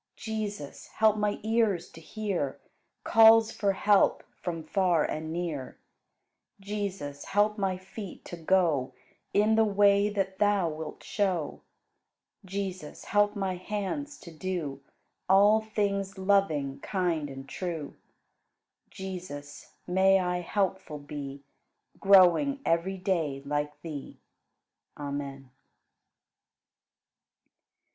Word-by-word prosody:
Jesus, 210 -8 -5
help 215 -1 +3
my 210 -1 -1
ears 220 -5 +1
to 165 - -13
hear 185 -6 -3 0.4
Calls 225 0 +7
for 200 -2 0
help 205 +1 +3 0.2
from 165 -2 -4
far 175 -1 +2
and 155 +1 -4
near. 160 -6 -4 0.8
Jesus, 195 -8 -5
help 210 +1 +1
my 190 -2 0
feet 190 +1 -9
to - - -7
go 165 -6 +1 0.4
In 210 +2 +3
the 220 0 +5
way 205 -1 +4
that 195 -2 -2
Thou 205 -4 +3
wilt 155 0 -7
show. 185 -8 -1 0.8
Jesus, 190 -4 -5
help 205 0 +2
my 190 -2 -2
hands 210 +10 -4
to 170 - -11
do 160 -5 -4 0.5
All 205 +3 +6
things 200 -3 -2
loving, 190 -8 +1
kind, 170 -6 -1
and 135 0 -9
true. 165 -5 -5 0.9
Jesus, 175 -7 -8
may 190 +2 +4
I 180 -1 -1
helpful 190 -3 -2
be, 140 -1 -7 0.6
Growing 195 - +5
every 170 +4 +1
day 165 -8 -1
like 145 0 -2
Thee. 150 -4 -7 0.8
Amen. 140 -2 -5
185 Hz, 105 wpm, -28 LUFS, 155-205 Hz, 0.9 s, Calls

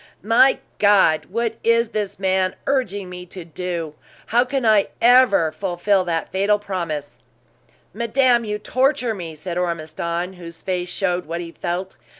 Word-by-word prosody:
"My 230 +5 +5 0.2
God! 200 -6 +4
What 225 +2 -2
is 230 0 +3
this 210 -2 -3
man 190 -1 +1
urging 205 -8 -1
me 180 0 -9
to 180 -1 -8
do? 170 -1 -4 0.3
How 240 +2 +3
can 260 -1 -2
I 215 -2 +4
ever 240 -9 +5
fulfill 185 +3 0
that 165 -2 -2
fatal 200 +2 +2
promise?" 170 -8 -5 0.7
"Madame, 235 +2 +2
you 210 -1 -3
torture 255 +2 +1
me!" 170 -6 -7
said 170 +3 -4
Ormiston, 170 +1 -3
whose 170 -2 -11
face 180 -1 -2
showed 180 -2 -1
what 170 +1 -3
he 170 -1 -6
felt. 180 +3 -4
190 Hz, 150 wpm, -21 LUFS, 175-225 Hz, 0.7 s, My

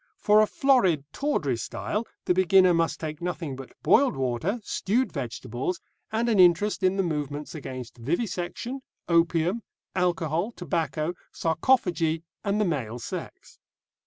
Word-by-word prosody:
For 210 0 +5
a 215 - +4
florid, 205 - +3
tawdry 160 - 0
style 210 - -3 0.2
the - - +3
beginner 185 0 +5
must 165 -1 +1
take 155 -1 -5
nothing 170 -5 -3
but 135 -1 -10
boiled 275 - +4
water, 135 - -1
stewed 225 +4 0
vegetables, 125 +4 -3 0.3
and 225 +2 0
an 220 -4 +2
interest 180 +4 +4
in 185 +1 +2
the 195 - +2
movements 150 -3 -3
against 130 -6 -7
vivisection, 180 - -3 0.3
opium, 170 +4 +2 0.3
alcohol, 175 +2 0
tobacco, 165 -2 -2 0.2
sarcophagy, 165 -3 +1 0.2
and 205 0 0
the 210 - +3
male 125 - -2
sex. 120 - -8
175 Hz, 130 wpm, -26 LUFS, 150-200 Hz, 0.3 s, For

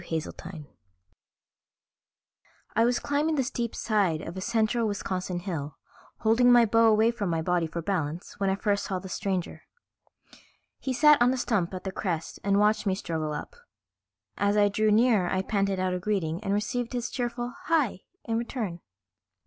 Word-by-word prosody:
Haseltine_ 160 0 -6 2.1
I 225 +1 +4
was 245 0 +2
climbing 295 +2 0
the 270 - +1
steep 240 -2 -3
side 195 -8 +1
of 165 - -7
a 190 - -5
central 225 +1 +1
Wisconsin 185 -3 -3
hill, 155 -6 -5 0.4
holding 235 +3 +4
my 240 -1 +7
bow 230 +1 +4
away 220 +1 +4
from 205 -5 -3
my 165 -1 -1
body 175 -1 +1
for 165 +1 -5
balance, 165 -2 -3
when 195 -1 +1
I 190 - +2
first 200 0 0
saw 190 - -2
the 185 +1 -7
stranger. 185 -1 -3 1.2
He 265 - -3
sat 300 +1 +5
on 245 +1 +5
a 260 - -1
stump 205 -8 0
at 185 - -6
the 190 - -3
crest 170 -4 -3
and 200 0 +2
watched 210 0 +2
me 190 - +2
struggle 160 -5 -3
up. 150 - -6 0.8
As 205 +1 +2
I 205 -1 +5
drew 215 +2 +1
nearer 215 -4 +4
I 190 0 0
panted 195 -2 0
out 185 0 0
a 180 - -2
greeting 180 -2 -2
and 195 - -2
received 230 +4 -1
his 245 0 -3
cheerful 240 -1 -3
"Hi" 300 - +1 0.2
in 230 -1 -1
return. 225 -7 -4
205 Hz, 175 wpm, -27 LUFS, 180-235 Hz, 2.1 s, my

